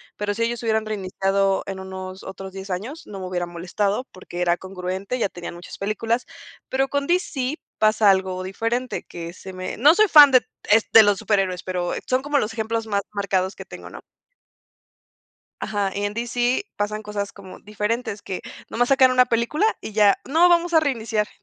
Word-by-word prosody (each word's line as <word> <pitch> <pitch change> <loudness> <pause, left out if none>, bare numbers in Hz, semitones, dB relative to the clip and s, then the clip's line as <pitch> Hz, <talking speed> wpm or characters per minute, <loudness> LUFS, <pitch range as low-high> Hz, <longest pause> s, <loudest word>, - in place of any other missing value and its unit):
Pero 205 0 -2
si 230 +3 -1
ellos 235 0 -2
hubieran 220 -1 +1
reiniciado 195 -1 0
en 195 -1 -6
unos 190 0 -8
otros 190 0 -8
10 195 0 -8
años, 220 - -5
no 200 -2 -8
me 185 - -5
hubieran 175 -1 -3
molestado, 200 +7 -1
porque 185 -1 -9
era 175 -1 +3
congruente. 190 +5 -5
Ya 220 - +2
tenían 175 -1 -8
muchas 175 +1 -10
películas, 225 +4 -1 0.4
pero 270 +1 +1
con 280 0 -2
DC 305 -7 0 0.2
pasa 215 -1 +4
algo 190 -1 -1
diferente 230 +6 -2
que 170 0 -8
se 190 +1 -10
me 185 0 -5
no 290 +7 +7
soy 430 +2 +5
fan 295 -5 +9
de 255 -1 +6 0.5
de 225 - +10
los 205 -1 +3
superhéroes, 190 -3 0
pero 180 -1 -2 0.2
son 255 0 +1
como 290 +1 0
los 220 -2 -2
ejemplos 225 0 -2
más 200 -2 0
marcados 195 -2 -1
que - - -8
tengo, - - -10
¿no? - - -10 1.6
Ajá, 205 -2 -1
y 205 0 -2
en 205 - -2
DC 240 - 0
pasan 210 +1 -2
cosas 205 -1 -4
como 190 -2 -12
diferentes 210 +1 -3
que 185 - -5 0.3
nomás 245 +1 +1
sacan 265 -1 +6
una 250 0 +5
película, 235 - +1 0.2
y - - -7
ya: 205 -1 +4
"No 325 +6 +4
vamos 345 0 +3
a 320 - +7
reiniciar", 225 -7 -1
210 Hz, 185 wpm, -23 LUFS, 190-245 Hz, 1.6 s, de